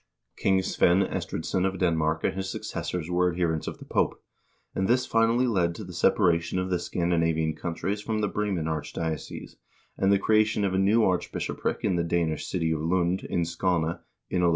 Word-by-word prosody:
King 95 -1 +2
Svein 95 0 +3
Estridsson 90 0 -2
of 95 0 0
Denmark 80 -3 +1
and - - +1
his 95 0 -4
suc - - -5
cessors 90 -3 -3
were 90 0 +2
adherents 85 -2 -1
of - - -4
the - - -12
Pope, - - 0 0.5
and 95 - 0
this 125 +2 +3
finally 115 +2 +3
led 90 -8 +1
to 105 - -7
the 90 -2 -9
separa 85 -1 +3
tion 85 +2 -4
of 90 0 -1
the 90 - +1
Scandinavian 80 -2 0
countries 90 +5 -3
from 110 0 -2
the 105 - +1
Bremen 100 -5 -1
archdiocese, 80 0 -4 0.4
and 95 0 +3
the 100 - +5
creation 110 +1 +2
of 95 - 0
a 95 - +2
new 105 +4 +4
archbishopric 90 -3 -1
in 90 - +1
the 85 - +1
Danish 85 -2 -1
city 85 -3 0
of 80 -1 -1
Lund, 90 +2 +1
in 85 - 0
Skane, 85 -1 0 0.3
in 90 - +1
1104. 85 - +4
90 Hz, 195 wpm, -27 LUFS, 85-95 Hz, 0.5 s, the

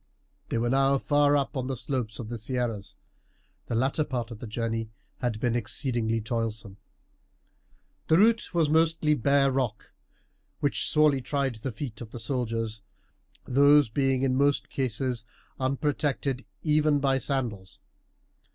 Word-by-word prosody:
They - - -1
were 120 +1 0
now 135 +1 +3
far 145 +1 +3
up 140 +1 -2
on 130 -1 -2
the 135 -1 -3
slopes 120 -4 -2
of 115 - -6
the 120 0 -5
Sierras. 115 -3 -3 0.7
The 115 - -2
latter 135 +6 +1
part 125 -4 -4
of 110 - -8
the 120 - -7
journey 115 0 -2 0.3
had 120 -3 -2
been 120 0 0
exceedingly 115 -1 0
toilsome. 110 -3 -3 1.3
The 160 - +5
route 225 +3 +3
was 165 -3 +2
mostly 160 0 +3
bare 140 +1 +3
rock, 125 -5 -2 0.7
which 145 - +1
sorely 150 -3 +4
tried 135 0 -1
the 130 +4 -4
feet 115 -1 -7
of 115 - -7
the 120 - -8
soldiers, 115 -3 -2 0.6
these 140 0 +5
being 135 +2 +1
in 130 -1 +2
most 140 +1 +2
cases 125 -2 -1 0.4
unprotected 135 0 -1 0.2
even 150 -1 +3
by 135 -1 +2
sandals. 120 -9 -3
130 Hz, 140 wpm, -27 LUFS, 115-140 Hz, 1.3 s, The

